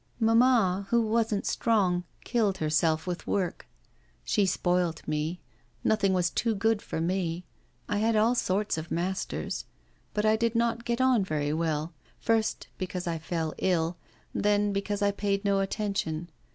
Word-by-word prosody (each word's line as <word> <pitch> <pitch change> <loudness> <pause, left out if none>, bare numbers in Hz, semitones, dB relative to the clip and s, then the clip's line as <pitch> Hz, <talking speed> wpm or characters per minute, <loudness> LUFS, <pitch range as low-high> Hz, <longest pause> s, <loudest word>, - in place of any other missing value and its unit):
'Mamma, 225 -5 +4
who 235 -1 +3
wasn't 220 -1 0
strong, 185 -6 +1 0.2
killed 210 -5 +1
herself 155 +1 +1
with 180 -1 -4
work. 185 -4 -1 0.6
She 200 -2 +2
spoilt 175 -3 0
me; 155 +3 -2 0.4
nothing 210 -3 +2
was 180 -2 +1
too 230 -2 0
good 220 +1 +1
for - - -4
me. 175 0 -1 0.4
I 205 0 0
had 225 +1 +2
all 220 +3 +4
sorts 200 -6 0
of 160 +2 -7
masters, 185 +3 -2 0.5
but 210 0 +1
I 215 0 +5
did 230 0 0
not 235 0 +1
get 235 +1 0
on 255 -5 +4
very 150 -4 -1
well; 160 0 -1 0.3
first, 225 -1 +1
because 180 -1 -3
I 165 -2 -2
fell 160 -1 -2
ill, 170 -2 +1 0.4
then 205 0 +2
because 200 +1 -1
I 200 - +3
paid 200 0 -1
no 200 -1 +3
attention. 195 -5 -2
195 Hz, 150 wpm, -28 LUFS, 170-220 Hz, 0.6 s, I